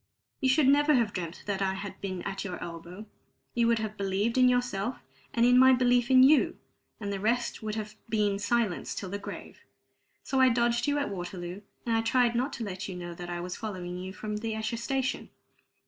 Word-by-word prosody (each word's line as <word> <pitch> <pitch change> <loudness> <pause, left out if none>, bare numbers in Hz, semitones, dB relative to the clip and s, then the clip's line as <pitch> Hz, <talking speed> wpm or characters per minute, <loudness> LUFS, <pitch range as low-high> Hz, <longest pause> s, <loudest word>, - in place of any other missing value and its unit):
You 265 - +2
should 270 +1 +4
never 290 +2 +5
have 230 -4 +1
dreamt 170 -2 -5
that 200 -1 -2
I 190 0 +1
had 195 0 -7
been 185 -3 -4
at 195 -1 -4
your 185 -3 -5
elbow; 170 +4 -8 0.5
you 235 -1 +2
would 235 0 +3
have 215 -1 -4
believed 200 +3 0
in 255 -1 +6
yourself, 245 -2 0 0.3
and 235 0 +3
in 245 +1 +6
my 260 0 +8
belief 245 -1 +3
in 260 -1 +7
you, 290 +3 +5 0.4
and 200 -2 -3
the 195 - -3
rest 235 +4 0
would 215 -1 -3
have 215 -1 -5 0.2
been 210 -3 +1
silence 215 -3 0
till 190 -2 -5
the 200 - -3
grave. - - -8 0.6
So 265 -1 +1
I 260 - +7
dodged 235 0 +1
you 290 0 +2
at 285 - -1
Waterloo, 175 0 -6 0.2
and 230 -1 +1
I 225 - +3
tried 240 +1 +2
not 255 +4 0
to 235 - -4
let 195 -1 -5
you 185 - -5
know 175 -1 -6
that 175 +1 -8
I 175 0 -3
was 180 +1 -5
following 185 -5 -5
you 185 +1 -6
from 210 +2 -5
Esher 220 0 -2
station. 265 +2 -2
215 Hz, 210 wpm, -29 LUFS, 195-245 Hz, 0.6 s, my